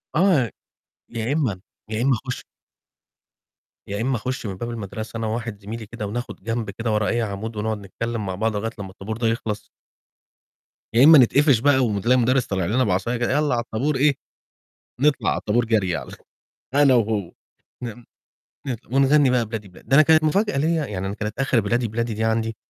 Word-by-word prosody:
آه، 155 - +3 0.6
يا 115 +3 -2
إمّا 125 - 0 0.3
يا 110 +1 -1
إمّا 130 -1 +3
خُش 125 - -4 1.4
يا 100 +2 -3
إمّا 130 +2 0
أخُش 130 +2 -4
من 95 -3 -4
باب 120 +4 -4
المدرسة 110 0 -6
أنا 115 - -2
وواحد 110 -1 -4
زميلي 110 +2 -7
كده، 110 0 -6
وناخد 120 -1 -6
جنب 115 0 -2
كده 115 +3 -3
ورا 105 -1 +1
أي 120 0 +1
عمود، 110 +1 -4
ونقعد 110 +1 -2
نتكلّم 110 +3 -4
مع 95 -1 -3
بعض 110 +2 -1
لغايّة 110 +2 -2
لمّا 100 -2 -6
الطَابور 105 +3 -6
ده 115 - 0
يخلص. 110 -2 -3 1.2
يا 120 +4 +6
إمّا 155 +1 +9
نتقفش 135 0 +5
بقى، 140 +2 +4
وم 105 -3 -1
تلاقي 125 +5 +3
مدرس 125 +1 +2
طالع 95 -3 -1
لنا 120 +8 +2
بعصاية 110 +4 0
كده 120 - 0
"يالّا 150 0 +2
على 120 -1 0
الطابور." 130 +6 -1
إيه؟ 140 +1 +3 0.9
نطلع 145 0 +2
علي - - -1
الطابور 115 +3 +1
جري 105 -7 +1
عل - - -7 0.6
أنا 140 -1 +5
وهو 105 -6 0 0.5
فاهم، 120 0 -7 0.6
ن - - 0
ن - - -1 0.2
ونغني 140 +1 +4
بقى 125 -2 +2
بلادي، 110 -2 -6
بلادي. 90 - -17
ده 135 - +5
أنا 150 - +9
كانت 155 +1 +5
مفاجأة 195 +3 +1
ليّا 160 +1 +1
يعني 95 -4 -4
أنا 100 - -3
كانت 105 +2 -5
آخر 135 -3 +2
بلادي، 115 +3 0
بلادي 115 +1 -2
دي 110 - -2
عندي: 110 0 0
115 Hz, 195 wpm, -23 LUFS, 105-130 Hz, 1.4 s, إمّا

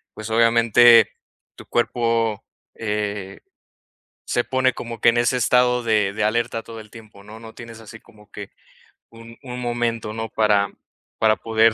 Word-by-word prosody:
pues, 110 +1 -8
obviamente, 115 0 +5 0.4
tu - - -13
cuerpo, 115 -2 -1 0.3
eh, 105 -3 -4 0.9
se 120 - -1
pone 130 +1 0
como 115 -2 -8
que - - +3
en 115 - +4
ese 120 +2 +1
estado 125 0 +2
de 105 -4 +1
de 110 - -4
alerta 115 +1 -1
todo 115 -1 -11
el 110 - -14
tiempo, 110 -3 -15
¿no?, 110 +2 -12
no 110 -1 -12
tienes 115 -1 -11
así 115 +1 -12
como 105 -3 -21
que 105 -1 -9 0.6
un 115 0 -14
un 125 -1 -7
momento, 120 -2 -3
¿no?, 110 0 -5
para 105 -2 +1 0.5
para 110 -1 +2
poder 110 0 +2
115 Hz, 160 wpm, -21 LUFS, 110-120 Hz, 0.9 s, obviamente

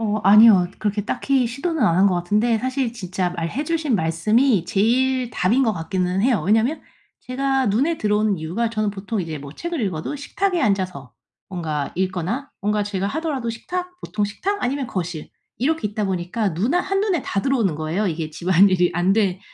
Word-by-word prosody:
어 215 -1 0
아니요. 205 -3 +7
그렇게 205 -1 -1
딱히 265 -1 0
시도는 295 +3 -2
안 170 -5 +3
한 195 +2 +5
것 185 - +2
같은데 210 +7 +1
사실 255 -1 -2
진짜 185 -4 -3
말해 175 - -3
주신 310 -7 0
말씀이 190 +6 +2
제일 245 +6 +1
답인 235 +9 +2
것 220 - +2
같기는 180 +2 -1
해요. 240 -7 +2
왜냐하면 225 +9 +2 0.4
제가 270 0 0
눈에 275 +11 +1
들어오는 210 -2 +1
이유가 185 +9 -2
저는 215 -2 -1
보통 200 +1 -4
이제 160 -3 -5
뭐 140 0 -9
책을 340 - -4
읽어도 185 - -3
식탁에 355 +4 -1
앉아서 185 - -1 0.4
뭔가 155 -6 -3
읽거나 190 - -2
뭔가 210 +1 0
제가 200 -1 -2
하더라도 285 -4 -2
식탁, 360 +11 -5
보통 210 -1 -2
식탁 390 - -3
아니면 270 +1 -1
거실 175 -8 -5 0.3
이렇게 295 -2 0
있다 210 0 -3
보니까 190 +1 -2
눈 225 - 0
아 355 - +4
한눈에 390 -4 0
다 195 - -2
들어오는 235 - +1
거예요. 160 +7 -2
이게 160 -2 -3
집안일이 180 +1 +3
안 175 +2 +2
된 195 -3 +1
210 Hz, 385 characters per minute, -22 LUFS, 185-260 Hz, 0.4 s, 아니요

